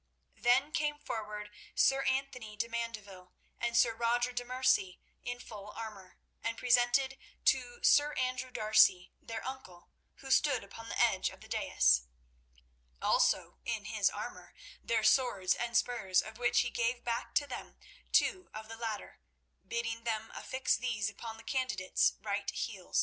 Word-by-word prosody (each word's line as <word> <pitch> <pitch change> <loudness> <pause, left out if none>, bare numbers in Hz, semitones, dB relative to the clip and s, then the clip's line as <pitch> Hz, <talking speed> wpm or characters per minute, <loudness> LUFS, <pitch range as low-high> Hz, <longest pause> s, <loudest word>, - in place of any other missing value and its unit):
Then 265 +5 +3
came 295 -1 0
forward 210 -5 -5 0.2
Sir 270 0 +4
Anthony 260 -5 -2
de 230 +3 -1
Mandeville 210 -6 -6 0.3
and 235 0 0
Sir 235 -1 +5
Roger 240 +2 +1
de 245 0 -3
Merci 255 -7 +1 0.2
in 245 0 -5
full 210 -4 -9
armour, 205 -5 -8 0.3
and 230 0 -2
presented 250 +2 +3 0.3
to 485 0 +1
Sir 295 +1 +5
Andrew 255 0 -1
D'Arcy, 215 -6 +4
their 225 -1 -6
uncle, 260 -10 -9 0.2
who 270 - -8
stood 260 -4 +3
upon 225 +3 -10
the - - -3
edge - - +3
of - - -14
the - - -12
dais, - - +3 0.9
also - - +2
in - - -3
his - - +2
armour, - - -8 0.3
their 225 -2 +1
swords 220 -5 +3
and 235 -1 0
spurs, 195 -8 +2
of 220 +2 -10
which 245 0 +3
he 240 - -2
gave 235 +1 -1
back 235 -1 -3
to 290 - +3
them 270 - -8 0.4
two 370 -1 +2
of 215 0 -8
the 225 - -6
latter, 220 - -5 0.5
bidding 230 0 -3
them 225 -1 -2
affix 260 0 0
these 215 -5 -1
upon 225 +2 -8
the 225 - -13
candidates' 240 -9 +1
right 200 -1 -2
heels. 195 -5 -2
230 Hz, 155 wpm, -32 LUFS, 210-255 Hz, 0.9 s, Sir